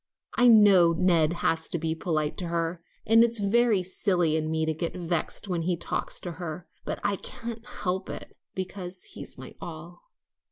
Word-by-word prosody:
I 245 -1 +4
know 200 -7 +7
Ned 165 -2 +3
has 160 0 +2
to - - -1
be 160 0 -1
polite 155 -3 -1
to 180 - -3
her; 170 0 -2 0.2
and 225 +1 +6
it's 235 0 +2
very 210 -1 +3
silly 175 -3 +1
in 155 0 -1
me 160 0 0
to 160 - 0
get 165 +2 -4
vexed 175 +2 -2
when 175 -3 -1
he 175 +1 0
talks - - -2
to 175 - -5
her; 170 +1 -5 0.2
but - - -3
I 205 -1 +1
can't 235 -1 -6
help 190 -5 -3
it, - - -8 0.2
because 185 -1 -5
he's - - -6
my - - -9
all." - - -8
180 Hz, 185 wpm, -27 LUFS, 165-205 Hz, 0.2 s, know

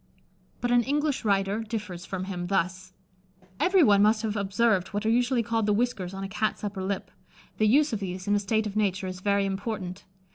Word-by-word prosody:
But 245 - 0
an 245 0 +5
English 290 +2 0
writer 200 0 +1
differs 210 -5 -5
from 190 -1 -4
him; 180 -2 -4
thus: 185 0 -1 0.7
"Every 370 -1 +4
one 205 -5 +5
must 215 +2 +3
have 215 -1 -1
observed 200 -1 +1
what 205 +1 -4
are 220 - +3
usually 245 +1 +2
called 225 -1 0
the 210 - +3
"whiskers" 215 -5 -1
on 195 - -5
a - - -3
Cat's 215 +3 -2
upper 200 -2 -3
lip. 195 +1 -3 0.5
The 215 - +4
use 285 +4 +4
of 215 - -1
these, 185 0 -5
in 205 - +2
a 205 - +3
state 215 +2 0
of 210 -1 -5
nature, 195 -3 0
is 185 0 -5
very 200 +1 +1
important. 195 -2 -4
205 Hz, 210 wpm, -27 LUFS, 195-225 Hz, 0.7 s, an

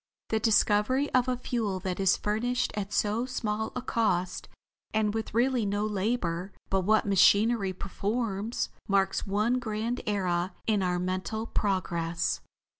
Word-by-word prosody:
The 220 - +1
discovery 220 +5 +3
of 255 0 +3
a 250 -1 0
fuel 225 -6 -2
that 185 -1 -3
is 195 -1 +4
furnished 245 +4 -1
at 205 -1 -3
so 215 +5 0
small 220 -3 -2
a 250 - -3
cost 185 -8 0 0.5
and 215 -1 +2
with 220 -1 -4
really 250 0 +2
no 205 +1 0
labor 195 -3 -1 0.2
but 195 0 +3
what 215 +4 +3
machinery 200 +2 +4
performs, 205 +3 -2 0.2
marks 195 -1 +1
one 215 +6 +1
grand 230 +1 -2
era 185 -3 0
in 210 -3 +2
our 180 -1 +1
mental 185 +4 -2
progress." 170 -6 -1
210 Hz, 140 wpm, -28 LUFS, 190-230 Hz, 0.5 s, is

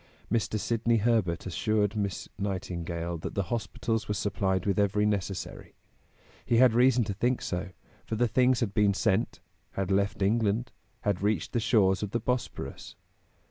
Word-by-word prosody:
Mr. 110 -2 0
Sidney 115 +1 +1
Herbert 110 -6 +1
assured 105 +3 0
Miss 100 -2 -2
Nightingale 85 -3 -3
that - - -6
the 100 - +1
hospitals 115 0 -2
were 105 - -1
supplied 95 -2 0
with 100 0 +1
every 105 +1 +2
necessary. 100 -3 -3 0.7
He 115 - +2
had 125 -1 +6
reason 125 0 +4
to 100 - -3
think 125 +5 0
so, 90 +1 -3 0.3
for 110 - -4
the 120 +2 +2
things 125 +1 +3
had 105 -4 -1
been 100 -2 +3
sent, 105 -2 0 0.3
had 95 0 -2
left 100 0 +1
England, 110 +3 +1 0.3
had 100 -3 -1
reached 105 -4 0
the 120 - +2
shores 100 -5 +3
of 105 - -2
the 120 - +1
Bosporus. 125 +2 -4
105 Hz, 160 wpm, -28 LUFS, 95-115 Hz, 0.7 s, had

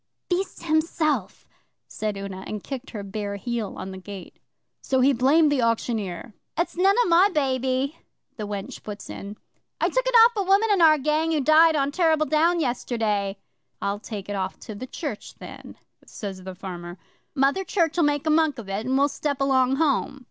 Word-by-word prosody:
'Beast 370 +2 -2
himself!' 310 - 0 0.4
said 210 -2 -4
Una, 195 -1 -6
and 210 -2 -5
kicked 270 -1 -6
her 210 -4 -6
bare 200 +1 -4
heel 230 0 -4
on 190 - -6
the 190 - -8
gate. 195 -1 -10 0.4
'So 260 - 0
he 270 +2 +4
blamed 290 +5 +4
the 280 -3 +2
auctioneer. 220 -4 -2 0.2
"It's 340 - -1
none 385 +3 +4
o' - - -1
my 350 +4 +5
baby," 265 -1 0 0.4
the 210 -2 -5
wench 200 -1 -6
puts 210 -1 -8
in. 200 +1 -8 0.4
"I - - +2
took - - 0
it - - +1
off 475 - +4
a 410 - 0
woman 395 +4 +3
in 385 - +2
our 310 -2 +7
gang 305 +3 0
who 315 - +1
died 310 +3 +5
on 280 -1 +1
Terrible 320 -2 +2
Down 330 +3 +2
yesterday." 220 -7 -1 0.4
"I'll 200 +1 -2
take 210 -3 -7
it 205 - -3
off 190 -1 -3
to 220 - -8
the 250 +5 -7
church 270 -6 -6
then," - - -11 0.3
says 190 -3 -7
the 190 -1 -7
farmer. 175 -2 -8 0.4
"Mother 280 +7 +2
Church'll 345 -2 +1
make 290 -1 +1
a 310 - +2
monk 310 -3 +2
of 225 -4 -8
it, 200 +4 -3
and 260 +1 +2
we'll 280 +1 +4
step 285 0 -3
along 265 -1 +3
home." 280 -2 0
265 Hz, 190 wpm, -24 LUFS, 205-315 Hz, 0.4 s, our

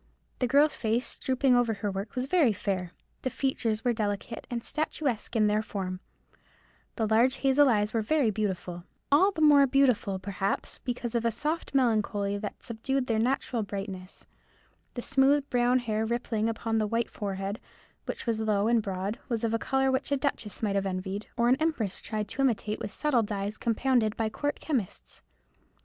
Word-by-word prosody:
The 250 - +1
girl's 285 +4 +4
face, 230 +2 -1
drooping 260 0 +2
over 240 -2 +2
her 205 0 -2
work, 195 +2 -5
was 255 0 -1
very 290 -6 +3
fair. 190 -3 -2 0.3
The 260 - -1
features 235 -4 -1
were 245 - +3
delicate 210 +1 -3
and 235 -1 -3
statuesque 290 -7 -1
in 215 -2 +4
their 210 +1 +2
form; 185 -4 -4 1.0
the 225 - 0
large 230 +5 +3
hazel 270 +1 +5
eyes 210 -2 +1
were 225 - +1
very 250 0 +2
beautiful—all 205 - 0
the 320 - -4
more 285 -2 +7
beautiful, 250 -7 +2
perhaps, 195 +1 -3
because 245 -2 -3
of 235 -1 0
a 230 - +3
soft 300 +7 -3
melancholy 210 -5 +1
that 205 0 -6
subdued 250 +3 -2
their 225 -3 0
natural 245 0 0
brightness; 195 -2 -6 0.7
the 245 - -4
smooth 275 +1 +3
brown 245 0 +3
hair 220 -3 -1
rippling 225 -1 -1
upon 225 0 -1
the 215 - +1
white 230 +2 -1
forehead, 195 +1 -4 0.5
which - - -5
was 230 -2 0
low 210 -1 +1
and 235 -1 +3
broad, 195 +1 -3
was 235 -2 -1
of 225 -1 0
a 230 - +1
colour 265 +2 +1
which 260 +2 -1
a 280 - +3
duchess 255 -7 -3
might 205 -2 +1
have 195 0 0
envied, 190 +2 -4
or 235 -1 +3
an 255 +2 +4
empress 285 - -1
tried 215 -1 -3
to 265 - -3
imitate 220 -5 0
with 205 - -5
subtle 295 -6 +2
dyes 205 -1 -3
compounded 230 -1 +1
by 225 -1 0
court 290 +6 -3
chemists. 255 - -3
225 Hz, 180 wpm, -28 LUFS, 205-260 Hz, 1.0 s, more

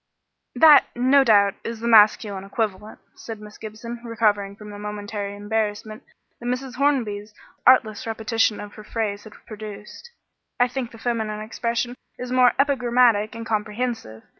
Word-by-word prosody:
"That, 310 -2 +7
no 260 +3 +4
doubt, 200 -5 +4
is 230 -1 -5
the 235 - -3
masculine 210 -3 +4
equivalent," 210 0 -4 0.2
said 225 -2 -9
Miss 210 0 -13
Gibson, 230 +2 -8
recovering 210 -4 0
from 210 0 -11
the 205 - -9
momentary 205 -1 -5
embarrassment 215 +2 -3 0.4
that 240 - -7
Mrs. 250 +1 -3
Hornby's 220 -7 0 0.3
artless 230 -4 +4
repetition 225 -1 0
of 205 0 -8
her 215 - -11
phrase 210 -2 -3
had 215 - -12
produced. 210 - -10 0.5
"I 245 - +5
think 255 -1 -4
the 230 - -14
feminine 220 -2 -2
expression 235 +2 -2 0.2
is 250 0 -6
more 255 -1 +5
epigrammatic 245 -6 +2
and 230 0 -6
comprehensive. 215 - -3
220 Hz, 145 wpm, -23 LUFS, 210-240 Hz, 0.5 s, That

